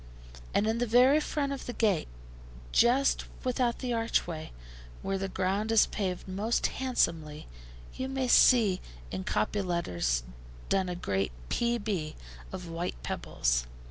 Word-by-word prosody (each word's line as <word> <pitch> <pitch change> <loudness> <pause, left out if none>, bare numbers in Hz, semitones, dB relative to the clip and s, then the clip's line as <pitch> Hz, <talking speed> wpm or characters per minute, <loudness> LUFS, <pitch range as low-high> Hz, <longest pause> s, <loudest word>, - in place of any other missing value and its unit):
And 205 - +3
in 225 +1 0
the 245 - +1
very 250 +6 +6
front 290 -2 -1
of 275 - -7
the 245 - -3
gate, 205 -9 +1 0.6
just 260 - +3 0.2
without 250 -1 +1
the 250 -2 -2
archway, 175 -8 -1 0.5
where 195 0 -1
the 195 - -2
ground 195 +4 0
is 225 - +6
paved 190 -4 -3
most 205 +5 0 0.2
handsomely, 165 - 0 0.5
you 260 0 -4
may 265 -1 -1
see 220 -6 +5 0.3
in 95 - -3
copy 105 - 0
letters 90 - 0 0.5
done 190 -2 +1
a 180 - -3
great 95 - -1 0.2
P.B. 205 -10 -1 0.4
of 180 -2 -6
white 165 +1 -3
pebbles. - - -1
195 Hz, 140 wpm, -30 LUFS, 170-240 Hz, 0.6 s, very